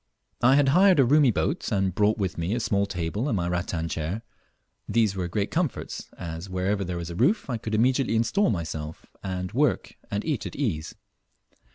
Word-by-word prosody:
I 130 +3 +6
had 140 -1 +4
hired 185 +3 +5
a 135 - +6
roomy 145 +1 +5
boat, 145 - -1
and 95 -3 +1
brought 105 +3 +2
with 95 -3 -2
me 85 +6 -1
a - - -1
small 100 -3 +1
table 95 - -2
and 115 - +1
my 85 -1 -1
rattan 85 -1 -2
chair. 85 +7 -3 0.7
These 110 -4 +2
were 90 -2 -2
great 100 +3 -2
comforts, 165 -5 -2
as, 85 +1 -6
wherever 95 +2 -1
there 90 -1 -4
was 85 0 -5
a - - -6
roof, 140 - +2
I 120 - -1
could 110 0 -3
immediately 125 +2 +2
instal 115 - +2
myself, 80 -5 -4 0.2
and 90 -1 -4
work 140 +3 +1 0.2
and 100 +1 -2
eat 150 -7 -1
at - - -9
ease. 95 - -2
105 Hz, 195 wpm, -26 LUFS, 90-125 Hz, 0.7 s, I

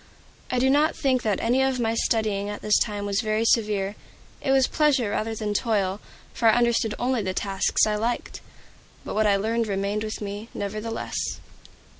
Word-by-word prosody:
I 255 - -1
do 255 +2 +3
not 295 +3 +3
think 260 -2 +1
that 210 -4 0
any 245 +3 +2
of 265 -1 +1
my 225 -1 +1
studying 215 -3 0
at 205 - -6
this 210 - +4
time 205 -2 -2
was 200 +1 0
very 215 0 0
severe; 210 -4 +1 0.5
it - - -3
was 270 -1 +5
pleasure 270 -9 +2
rather 225 +1 -2
than 210 -1 -2
toil, 205 -3 0 0.3
for 230 - +1
I 220 - +4
undertook 235 -2 +2
only 250 -1 0
the 185 -2 -3
tasks 195 -1 +1
I 215 - 0
liked. 230 +3 -3 0.6
But - - -4
what 215 0 +2
I 200 - +4
learned 225 +3 0
remained 200 +1 -1
with 215 0 -4
me, 205 +2 -6
nevertheless. 215 +3 -4
220 Hz, 185 wpm, -25 LUFS, 205-240 Hz, 0.6 s, was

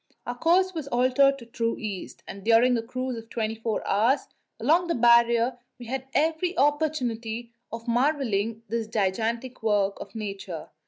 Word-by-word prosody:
Our 245 - -3
course 360 +7 +3
was 315 -5 -5
altered 260 +2 +3
to 240 - -12
true 230 0 -2
east, 205 -4 -6
and 195 0 -8
during 235 +3 +5
a 230 - 0
cruise 255 +2 -4
of 225 0 -10
twenty 220 -2 -2
four 225 -1 -3
hours 235 +8 +3 0.4
along 325 +9 +3
the 335 - 0
Barrier 235 +1 +4 0.2
we 245 - -10
had 260 +2 -4
every 325 +4 +1
opportunity 245 -6 0 0.2
of 230 +1 -7
marvelling 230 -4 0
at - - -43
this 230 -1 -1
gigantic 225 +4 -1
work 205 -2 +1
of 200 - -10
Nature. 195 -6 -6
235 Hz, 165 wpm, -26 LUFS, 225-265 Hz, 0.4 s, during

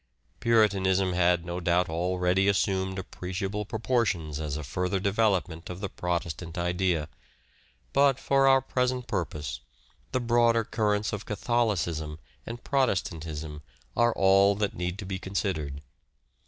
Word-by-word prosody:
Puritanism 95 -5 +3
had 90 -1 +2
no 85 +1 -3
doubt 85 +1 +2
already 90 +3 +1
assumed 95 -1 +1
appreciable 95 +3 -4
proportions 110 - -1
as 75 -2 -3
a 75 - -5
further 90 +8 -1
develop 100 -2 +2
ment 80 -1 -10
of 90 0 -6
the 100 -1 -3
Protestant 85 -1 -3
idea; 90 -2 0 0.9
but, 140 -2 +4
for 135 0 +3
our 135 0 +6
present 125 -1 -1
purpose, 75 - -3 0.5
the 130 - +1
broader 120 -1 +3
currents 105 -1 0
of 105 0 -5
Catholicism 100 -9 -1 0.3
and 120 +1 -7
Protestantism 80 - -1 0.3
are 120 0 +4
all 95 +1 +5
that 105 0 -1
need 90 +2 -4
be 95 -1 -3
considered. 80 -8 -3
95 Hz, 125 wpm, -28 LUFS, 85-110 Hz, 0.9 s, our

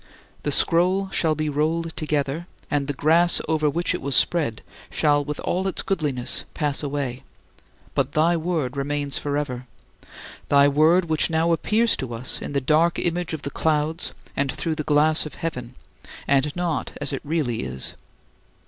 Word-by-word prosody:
The - - -1
scroll 185 +3 +2
shall 160 -4 +2
be 155 0 -2
rolled 160 +3 -1
together, 150 +2 -2 0.2
and 145 -1 0
the 145 - -1
"grass" 165 +5 +4
over 155 -2 +2
which 170 +5 0
it 180 - -3
was 140 0 -1
spread 145 -11 +1 0.3
shall, 145 -1 +2
with 150 +1 -5
all 185 +2 -1
its 190 - -2
goodliness, 145 -10 -1
pass 145 -3 0
away; 140 -3 -3 0.7
but 140 +1 0
thy 165 +3 +3
Word 160 -6 -1
remains 145 0 -2
forever 140 -4 -3 0.8
thy 140 0 +6
Word 155 +5 +4
which 160 0 +2
now 165 +1 +2
appears 220 +8 +3
to 120 -3 -4
us 120 +3 -3
in - - -5
the 140 - +2
dark 155 +5 +3
image 175 -1 -1
of 155 - -10
the 140 - -4
clouds 160 +1 0 0.2
and 140 -1 0
through 165 - -2
the 155 - -3
glass 155 +1 +3
of - - -11
heaven, 125 -7 -5 0.5
and 140 +1 +2
not 175 -3 -2
as 145 -1 0
it 135 - -3
really 145 -6 -1
is. 65 0 -4
150 Hz, 165 wpm, -23 LUFS, 140-165 Hz, 0.8 s, thy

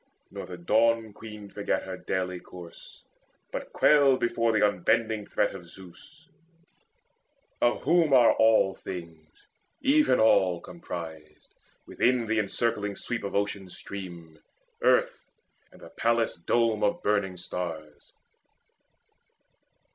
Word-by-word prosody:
Nor - - -7
the 90 - -8
Dawn 110 +4 +2
queen 105 -1 -10
forgat 100 +1 -2
her 95 -1 -6
daily 90 0 -3
course, 85 -1 -13 0.5
But - - -6
quailed 140 -3 +4
before 115 -1 +1
the 105 -1 +4
unbending 110 +2 0
threat - - 0
of - - -10
Zeus, 95 - -15 1.3
Of 120 - +1
whom 165 0 +3
are 125 -3 +6
all 110 -3 +4
things, 85 -5 -10 0.4
even 300 +2 +4
all 95 -5 +4
comprised 80 - -9 0.3
Within 125 -1 +1
the 110 0 0
encircling 105 0 -1
sweep 120 +3 -4
of 100 - -5
Ocean's 100 -2 -2
stream, 85 -6 -9 0.4
Earth - - +2 0.4
and - - -17
the - - -11
palace 115 0 0
dome 110 +5 +1
of 105 - 0
burning 100 -3 0
stars. 80 -4 -6
105 Hz, 115 wpm, -27 LUFS, 90-115 Hz, 1.3 s, are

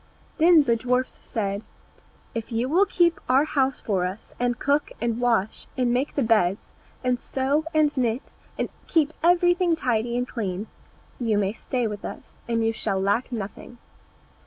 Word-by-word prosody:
Then 330 -1 +7
the 235 -4 +2
dwarfs 250 +2 -1
said, 200 -1 -3 0.7
"If 230 0 -5
you 230 +2 0
will 365 +8 +3
keep 345 -3 +2
our 265 +3 +5
house 270 -3 +1
for 195 -4 0
us, 185 +4 -5
and 245 0 0
cook, 285 +1 +1
and 235 0 -1
wash, 230 -4 +1
and 245 -2 +2
make 260 +4 -1
the 280 - +2
beds, 210 -4 +1 0.3
and 250 -1 +1
sew 275 +5 0
and 305 -2 +2
knit, 245 -1 0 0.3
and - - -1 0.2
keep 315 -2 +2
everything 350 0 +4
tidy 240 -5 0
and 245 +1 -1
clean, 200 -5 -3 0.5
you 225 -4 +1
may 200 0 +1
stay 245 +1 -2
with 210 -2 -4
us, - - -8
and 230 -1 +1
you 225 - +1
shall 195 -3 -1
lack 205 +7 0
nothing." 225 +1 -6
245 Hz, 165 wpm, -25 LUFS, 220-285 Hz, 0.7 s, Then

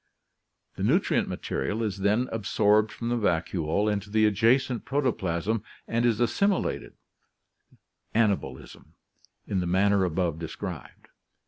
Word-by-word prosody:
The - - -3
nutrient - - +2
material 105 +12 -3
is 105 -2 -3
then 105 +6 +2
absorbed 105 0 +2
from 115 +2 -5
the 120 - +1
vacuole 85 -1 0
into 105 -1 -1
the 110 +1 +3
adjacent 115 +4 +2
protoplasm 115 - -1 0.2
and 120 +1 +1
is 115 -2 +1
assimilated 195 - 0 1.2
(anabolism) 110 -3 -1 0.5
in 100 - -1
the 90 - -2
manner 100 +2 +3
above 85 -2 -1
described. 80 -2 -7
105 Hz, 115 wpm, -27 LUFS, 95-115 Hz, 1.2 s, the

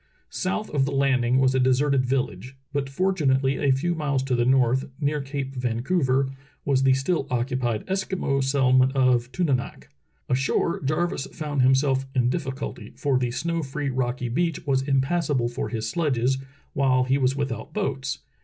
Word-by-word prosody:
South 195 +3 -2
of 140 -2 +2
the 140 - -2
landing 130 -3 +2
was 130 0 +3
a 130 - +2
deserted 130 +1 +2
village, 130 0 -2 0.2
but 140 -1 -1
fort 185 +7 0
unately 135 -3 +2
a 140 - +2
few 150 +7 +1
miles 145 -5 -1
to 135 -1 -2
the 120 0 +1
north, 130 0 +2
near 150 0 0
Cape 135 -1 -4
Vancouver, 130 +2 0 0.3
was 135 -2 +2
the 135 -1 +4
still 140 +2 -1
occupied 120 -2 -1
Eskimo 190 -8 -1
settlement 130 -1 +3
of 125 -2 +2
Tunanak. 140 -8 -2 0.4
Ashore, 135 +6 0
Jarvis 155 0 -1
found 150 -4 -3
himself 135 +1 +3
in 125 -1 +2
difficulty, 135 -4 -5
for 135 -3 +1
the 125 -1 0
snow 165 +7 -2
free 140 0 -3
rocky 125 -1 -2
beach 165 +6 -1
was 135 -2 +2
impassable 135 -1 +1
for 120 - -4
his 110 -2 -3
sledges, 130 -2 0 0.3
while 130 -2 +3
he 135 +2 +1
was 130 0 +2
without 135 -6 -4
boats. 140 -8 -3
135 Hz, 165 wpm, -25 LUFS, 130-145 Hz, 0.4 s, the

